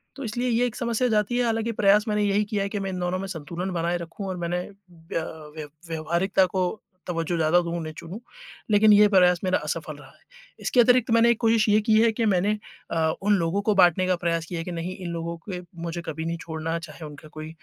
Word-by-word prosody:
तो 275 Hz, -, -7 dB
इसलिए 240 Hz, +3 st, -2 dB
ये 240 Hz, +1 st, +2 dB
एक 235 Hz, -, -7 dB
समस्या 235 Hz, +1 st, 0 dB
जाती 215 Hz, +2 st, +1 dB
है, 250 Hz, -, +2 dB
हालाँकि 225 Hz, 0 st, 0 dB
प्रयास 210 Hz, 0 st, +4 dB
मैंने 210 Hz, -1 st, +1 dB
यही 205 Hz, +1 st, +2 dB
किया 205 Hz, -1 st, -1 dB
है 200 Hz, -, -3 dB
कि 205 Hz, -, -3 dB
मैं 195 Hz, -1 st, -3 dB
इन 185 Hz, -, -4 dB
दोनों 180 Hz, +1 st, -1 dB
में 195 Hz, -, -4 dB
संतुलन 175 Hz, +1 st, -5 dB
बनाए 170 Hz, +1 st, 0 dB
रखूँ 170 Hz, +4 st, -7 dB
और 185 Hz, -1 st, -4 dB
मैंने 175 Hz, +1 st, -2 dB
अ, -, -, -13 dB, 0.8 s
व्यव 155 Hz, -2 st, -7 dB, 0.2 s
व्यावहारिकता 170 Hz, +4 st, +1 dB
को 185 Hz, 0 st, -1 dB, 0.4 s
तवज्जो 165 Hz, -1 st, -2 dB
ज़्यादा 160 Hz, +2 st, +3 dB
दूँ, 170 Hz, 0 st, -4 dB
उन्हें 155 Hz, -2 st, -5 dB
चुनूँ, 180 Hz, +6 st, -8 dB, 0.5 s
लेकिन 210 Hz, +1 st, +6 dB
ये 210 Hz, 0 st, +7 dB
प्रयास 180 Hz, -2 st, +5 dB
मेरा 185 Hz, -, +2 dB
असफल -, -, -4 dB
रहा -, -, -14 dB
है। -, -, -25 dB, 0.4 s
इसके 250 Hz, -, +1 dB
अतिरिक्त 245 Hz, 0 st, +4 dB
मैंने 230 Hz, +1 st, +5 dB
एक 230 Hz, -, -1 dB
कोशिश 225 Hz, -1 st, +3 dB
ये 210 Hz, +1 st, +5 dB
की 215 Hz, 0 st, +3 dB
है 230 Hz, 0 st, +4 dB
कि 230 Hz, +1 st, 0 dB
मैंने 205 Hz, +1 st, +2 dB, 0.3 s
अ, 160 Hz, -1 st, +1 dB
उन 205 Hz, +1 st, +3 dB
लोगों 170 Hz, +4 st, 0 dB
को 210 Hz, 0 st, +1 dB
बाँटने 185 Hz, -1 st, +4 dB
का 185 Hz, -, +2 dB
प्रयास 170 Hz, -1 st, -1 dB
किया 170 Hz, +1 st, -5 dB
है -, -, -3 dB
कि 180 Hz, -, -5 dB
नहीं 175 Hz, +2 st, -4 dB
इन 180 Hz, -2 st, -6 dB
लोगों 170 Hz, 0 st, -4 dB
पे 180 Hz, -2 st, -4 dB, 0.2 s
मुझे 170 Hz, 0 st, -4 dB
कभी 160 Hz, 0 st, -4 dB
नहीं 170 Hz, 0 st, -2 dB
छोड़ना, 160 Hz, 0 st, -3 dB
चाहे 160 Hz, -1 st, -10 dB
उनका 150 Hz, +1 st, -11 dB
कोई 155 Hz, 0 st, -8 dB
185 Hz, 240 wpm, -25 LUFS, 170-210 Hz, 0.8 s, ये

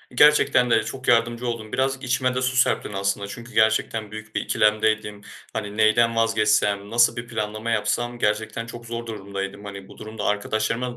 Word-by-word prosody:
Gerçekte 140 Hz, -3 st, +5 dB
de 110 Hz, -1 st, +3 dB
çok 130 Hz, +3 st, -7 dB
yardımcı 120 Hz, 0 st, +2 dB
oldun. 110 Hz, -2 st, -4 dB
Biraz 135 Hz, +1 st, 0 dB
içime 130 Hz, 0 st, 0 dB
de 130 Hz, -, 0 dB
su 130 Hz, 0 st, 0 dB
serptin 125 Hz, -4 st, +1 dB
aslında. 100 Hz, +1 st, -1 dB
Çünkü 120 Hz, +4 st, -10 dB
gerçekten 110 Hz, -1 st, +1 dB
büyük 110 Hz, 0 st, -9 dB
bir -, -, +1 dB
ikilemdeydim. 110 Hz, -1 st, +1 dB, 0.3 s
Hani, 105 Hz, -1 st, -5 dB
neyden 115 Hz, +2 st, +4 dB
vazgeçsem, 105 Hz, -3 st, +2 dB
nasıl 120 Hz, +1 st, +4 dB
bir 120 Hz, 0 st, -6 dB
planlama 110 Hz, 0 st, -3 dB
yapsam, 120 Hz, +2 st, -1 dB
gerçekten 110 Hz, +2 st, -1 dB
çok 120 Hz, 0 st, -10 dB
zor 115 Hz, 0 st, -5 dB
durumdaydım. 100 Hz, -2 st, -6 dB
Hani, 100 Hz, -1 st, -8 dB
bu -, -, -15 dB
durumda 110 Hz, -1 st, -7 dB
arkadaşlarıma 110 Hz, +4 st, -1 dB
110 Hz, 170 wpm, -23 LUFS, 105-120 Hz, 0.3 s, Gerçekte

